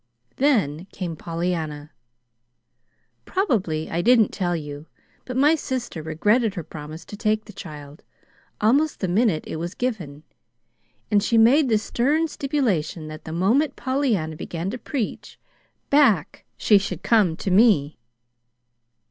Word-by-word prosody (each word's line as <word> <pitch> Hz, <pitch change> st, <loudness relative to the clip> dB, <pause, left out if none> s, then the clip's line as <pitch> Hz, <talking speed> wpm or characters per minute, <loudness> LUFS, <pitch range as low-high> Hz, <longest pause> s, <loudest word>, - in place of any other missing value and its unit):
"Then 195 Hz, -, +1 dB
came 175 Hz, -4 st, -5 dB
Pollyanna. 160 Hz, -3 st, -4 dB, 1.3 s
Probably 195 Hz, -, 0 dB
I 170 Hz, -, -1 dB
didn't 230 Hz, 0 st, +5 dB
tell 175 Hz, -3 st, -1 dB
you, 150 Hz, -1 st, -7 dB, 0.4 s
but 255 Hz, 0 st, -5 dB
my 290 Hz, +4 st, +5 dB
sister 255 Hz, -, -3 dB
regretted 205 Hz, +8 st, +1 dB
her 175 Hz, -, -4 dB
promise 155 Hz, +2 st, -9 dB
to -, -, -9 dB
take 215 Hz, 0 st, 0 dB
the 210 Hz, -, -12 dB
child, 150 Hz, -5 st, -10 dB, 0.6 s
almost 280 Hz, +9 st, +2 dB
the 190 Hz, -, -1 dB
minute 185 Hz, -2 st, +2 dB
it -, -, -5 dB
was 170 Hz, +3 st, -5 dB
given; 175 Hz, -, -4 dB, 0.9 s
and 205 Hz, -1 st, +4 dB
she 230 Hz, +2 st, +1 dB
made 255 Hz, +5 st, +5 dB
the 220 Hz, -, +4 dB
stern 285 Hz, +9 st, 0 dB
stipulation 225 Hz, -, -2 dB
that 155 Hz, 0 st, -10 dB
the 160 Hz, -, -6 dB
moment 220 Hz, -, +1 dB
Pollyanna 245 Hz, -, -1 dB
began 170 Hz, +4 st, -4 dB
to 255 Hz, -, -6 dB
preach, 255 Hz, -6 st, -5 dB, 0.5 s
back 245 Hz, -, +3 dB
she 205 Hz, -2 st, +5 dB
should 190 Hz, -3 st, -5 dB
come 200 Hz, -8 st, +3 dB
to 190 Hz, -, -3 dB
me. 185 Hz, -, +4 dB
200 Hz, 135 wpm, -23 LUFS, 160-245 Hz, 1.3 s, didn't